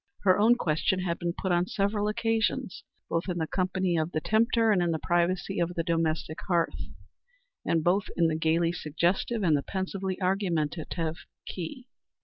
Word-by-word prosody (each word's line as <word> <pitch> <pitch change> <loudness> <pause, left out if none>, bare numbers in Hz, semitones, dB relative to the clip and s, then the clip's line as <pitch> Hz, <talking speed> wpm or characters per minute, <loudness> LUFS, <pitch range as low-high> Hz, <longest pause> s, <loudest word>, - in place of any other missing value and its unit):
Her 185 0 +4
own 225 +3 +6
question 180 -1 0
had 175 -2 -2
been 170 0 -1
put 190 - -2
on 175 +1 +2
several 205 +1 0
occasions, 225 0 -1 0.2
both 165 +3 -2
in 175 - -1
the 160 - 0
company 185 0 0
of 160 +2 -1
the 155 - +1
tempter 225 +4 +2
and 190 -4 +3
in 175 - +1
the 165 - 0
privacy 175 +2 0
of 175 +1 -1
the 165 - 0
domestic 160 -2 -1
hearth, 170 -2 0 0.8
and 165 -1 +1
both 190 +4 +2
in 170 - +4
the 160 -1 +2
gayly 165 +1 +2
suggestive 175 +7 -1
and 160 -4 +4
the 145 - +1
pensively 190 +2 -3
argumentative 170 -3 -1 0.3
key. 190 - -6
175 Hz, 170 wpm, -28 LUFS, 165-195 Hz, 0.8 s, own